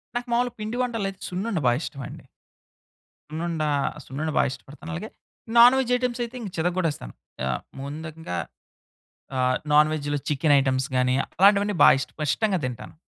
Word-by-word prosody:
నాకు 240 +1 -2
మాములుగా 245 0 +1
పిండి 215 +3 -4
వంటల్లో 230 -5 -1
అయితే 190 -1 -12
సున్నుండ 190 +3 -3
బాగా 120 0 +4
ఇష్టం 140 -4 -6
అండి. - - -11 1.1
సున్నుండ, 160 0 -2 0.4
సున్నుండ 150 +4 -4
బాగా - - +4
ఇష్టపడతాను. 150 +4 -10
అలాగే 195 +6 -5 0.5
నాన్ 240 +2 +9
వెజ్ 255 -2 -1
ఐటెమ్స్ 250 -1 -2
అయితే 235 +1 -7
ఇంక 210 - -5
చితకొటేస్తాను. 165 - -1 0.3
ఆహ్, 65 -1 -1 0.2
ముందుగా 155 - -6 1.0
ఆహ్, 130 0 +2 0.2
నాన్ 150 +1 +6
వేజ్‌లో 145 -1 -2
చికెన్ 145 +1 +2
ఐటెమ్స్ 130 -1 0
గాని 125 0 +2 0.2
అలాంటివన్నీ 200 +2 +5
బా - - +9
ఇష్టం 135 +4 -5
ఇష్టంగా 200 +5 +1
తింటాను. 125 -2 -6
165 Hz, 150 wpm, -25 LUFS, 140-215 Hz, 1.1 s, నాన్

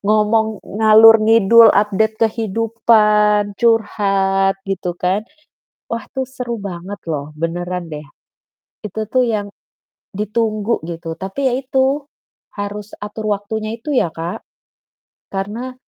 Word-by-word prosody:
ngomong 215 +1 +1 0.2
ngalor 220 +1 +8
ngidul 225 +1 +6
update 215 +2 +1
kehidupan, 210 -2 +2
curhat 195 -4 +2
gitu 185 -2 -2
kan. 190 +4 0 0.7
Wah, 230 0 -4
tuh 265 0 -2
seru 245 -3 -5
banget 190 +1 -6
loh 145 -2 -3
benaran 175 +2 -3
deh. 150 -1 -7 0.8
Itu 215 +1 -4
tuh 255 +4 +2
yang 215 -4 -1 0.7
ditunggu 215 +2 -1
gitu, 165 -1 -6
tapi 195 +10 -3
ya - - -2
itu 270 +2 0 0.5
harus 205 +1 -5
atur 210 +1 -3
waktunya 215 +2 -5
itu 290 +5 -4
ya, 175 - +2
Kak, 165 +2 -5 0.9
karena 215 +7 -4
210 Hz, 115 wpm, -18 LUFS, 195-225 Hz, 0.9 s, ngalor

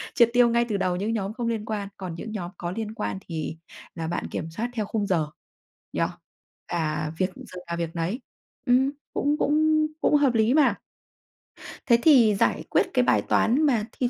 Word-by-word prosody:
triệt 235 -2 +6
tiêu 245 -1 +5
ngay 235 0 +2
từ 205 - 0
đầu 180 -1 0
những 210 +5 -1
nhóm 205 -1 -2
không 240 -1 -3
liên 220 -2 -2
quan, 205 -2 -3
còn 180 -4 -6
những 215 +6 -7
nhóm 180 -4 -5
có 175 0 -4
liên 220 +1 -4
quan 105 -2 -3
thì 160 0 -4 0.4
là 165 -1 -4
bạn 170 - -3
kiểm 160 - -4
soát 230 +8 -3
theo 215 -3 -2
khung 205 -1 -2
giờ 160 -5 +1 0.7
nhỉ? - - -1 0.7
À, 155 -2 -2
việc 185 0 +1
giờ 180 - -10
nào 170 0 -3
việc 170 0 -4
nấy. 180 +10 -2 0.4
Ừm, 260 +2 +3 0.2
cũng 290 +2 +1
cũng 310 +1 +3
cũng 300 - +3
hợp 275 -4 +3
lý 225 +3 +3
mà. 300 -2 +4 1.1
Thế 235 -3 +5
thì 240 -9 +6
giải - - +1
quyết - - +3
cái - - +3
bài - - +3
toán 250 +7 +2
mà 230 -7 +2
thì 250 -2 +2
215 Hz, 200 wpm, -25 LUFS, 175-245 Hz, 1.1 s, triệt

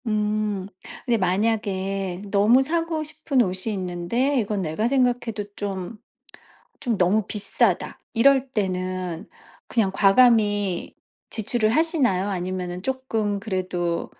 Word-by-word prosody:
음. 210 -2 -1 0.4
근데 240 -2 +2
만약에 195 -1 -1
너무 215 +6 +5
사고 330 +1 -1
싶은 305 -3 0
옷이 190 +2 -2
있는데 190 +9 -1
'이건 210 -2 -1
내가 175 +6 -1
생각해도 245 -5 0
좀 200 +1 -5 0.8
좀 235 -6 0
너무 190 +3 +2
비싸다.' 205 -1 0
이럴 270 +3 +4
때는 185 -4 -3 0.4
그냥 215 -5 +1
과감히 205 -3 +3 0.3
지출을 220 0 0
하시나요? 255 - +2
아니면은 180 -1 -3
조금 225 -5 -2
그래도 185 -4 -2
210 Hz, 240 characters per minute, -24 LUFS, 185-240 Hz, 0.8 s, 너무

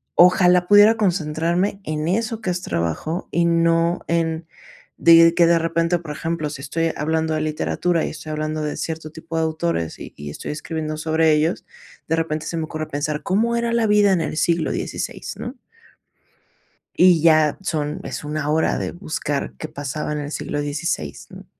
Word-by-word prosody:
ojalá 180 0 +5
pudiera 205 +2 +7
concentrarme 175 0 0
en 155 0 -2
eso 225 +3 -1
que 190 - -2
es 180 0 -3
trabajo 85 - -3
y 170 0 +2
no 170 0 +2
en 165 -1 -1 0.5
de 165 0 +7
que 170 - +5
de 170 0 +5
repente, 165 +1 +1
por 160 -3 -8
ejemplo, 165 -1 -3
si 140 -2 -7
estoy 165 +4 -1
hablando 160 +1 0
de 155 - -1
literatura 155 +2 0
y - - -3
estoy 155 0 -8
hablando 155 0 -2
de 150 - -3
cierto 160 -1 -4
tipo 165 +1 -8
de - - +2
autores 160 - -2
y - - -9
y 75 0 -7
estoy - - -6
escribiendo 155 0 -4
sobre 160 0 +2
ellos, 155 +3 0 0.4
de 165 - +1
repente 155 -1 -2
se 170 - -4
me 160 - -1
ocurre 155 0 -5
pensar, 150 +1 -3
¿cómo 230 +5 +1
era 235 0 0
la 230 -2 +2
vida 205 -1 +4
en 175 - +1
el 155 -1 -3
siglo 170 -2 +1
16, - - -4
no? 245 +3 -6 1.4
Y 180 -2 +6
ya, 155 -2 +4
son 155 -5 -2
es - - -6
1 150 0 -3
hora 160 +1 +1
de - - -3
buscar 155 -5 -3
qué 155 - -5
pasaba 145 0 -4
en 150 - -2
el 145 0 -5
siglo 145 - -3
16, 145 - -3
¿no? - - -12
160 Hz, 185 wpm, -21 LUFS, 155-175 Hz, 1.4 s, pudiera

